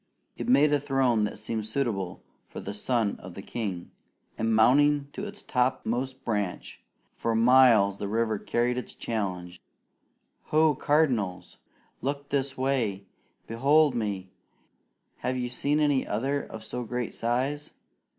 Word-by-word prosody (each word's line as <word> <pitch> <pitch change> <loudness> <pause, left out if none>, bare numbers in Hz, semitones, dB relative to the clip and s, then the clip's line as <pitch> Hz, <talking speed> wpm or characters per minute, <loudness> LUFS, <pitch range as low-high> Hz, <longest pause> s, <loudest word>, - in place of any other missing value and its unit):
It - - -5
made 145 +4 +5
a 145 - +3
throne 130 -6 +2
that 105 - -5
seemed 110 0 -3
suitable 110 -7 -2 0.3
for - - -7
the 100 - -6
son 110 0 0
of 90 -1 -10
the 95 - -8
king; 100 -8 -5 0.4
and 115 0 0
mounting 140 +5 +4
to 205 - -5
its 205 0 -9
topmost 130 +1 -1
branch, 105 -5 -3 0.3
for 115 -1 -1
miles 115 -4 +5
the 100 - -4
river 110 0 0
carried 120 +3 0
his 125 - -6
challenge: 90 -5 -4 0.8
"Ho, 155 0 +3
cardinals! 120 - 0 0.4
Look 140 +2 -3
this 140 -1 -1
way! 120 -7 -1 0.4
Behold 140 +5 +3
me! 100 -5 -3 0.9
Have 130 0 -2
you 125 -1 -2
seen 145 +4 0
any 145 -3 +2
other 135 +7 -1
of 110 0 -9
so 125 +3 -5
great 120 0 -3
size? 135 +6 -1
120 Hz, 140 wpm, -27 LUFS, 105-140 Hz, 0.9 s, made